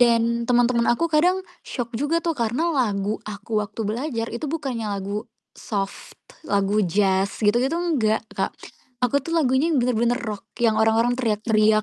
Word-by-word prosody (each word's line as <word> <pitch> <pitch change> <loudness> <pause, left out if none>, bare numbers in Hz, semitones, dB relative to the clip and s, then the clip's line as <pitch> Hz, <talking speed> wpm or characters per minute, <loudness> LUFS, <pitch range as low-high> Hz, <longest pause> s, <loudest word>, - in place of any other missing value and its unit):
Dan 235 -1 +3
teman-teman 240 -1 +3
aku 240 +8 +2
kadang 360 +5 +3 0.2
syok 240 -2 -4
juga 290 +8 0
tuh 335 - +1
karena 260 +6 0
lagu 210 -6 0
aku 210 +1 -2
waktu 210 +2 -6
belajar 230 +2 -2
itu 240 +6 -4
bukannya 270 -8 -3
lagu 205 +3 -4 0.2
soft, 200 -2 -5 0.3
lagu 200 +1 +2
jazz 195 +2 +1
gitu-gitu 245 +9 +2
enggak 260 -12 +1
Kak. - - -1 0.5
Aku 250 +3 +3
tuh 330 +4 -4
lagunya 270 0 +3
bener-bener 240 -2 +2
rock, 215 -5 -5 0.2
yang 220 -2 +3
orang-orang 225 +2 +3
teriak-teriak, 215 -2 +2
235 Hz, 145 wpm, -23 LUFS, 215-260 Hz, 0.5 s, Dan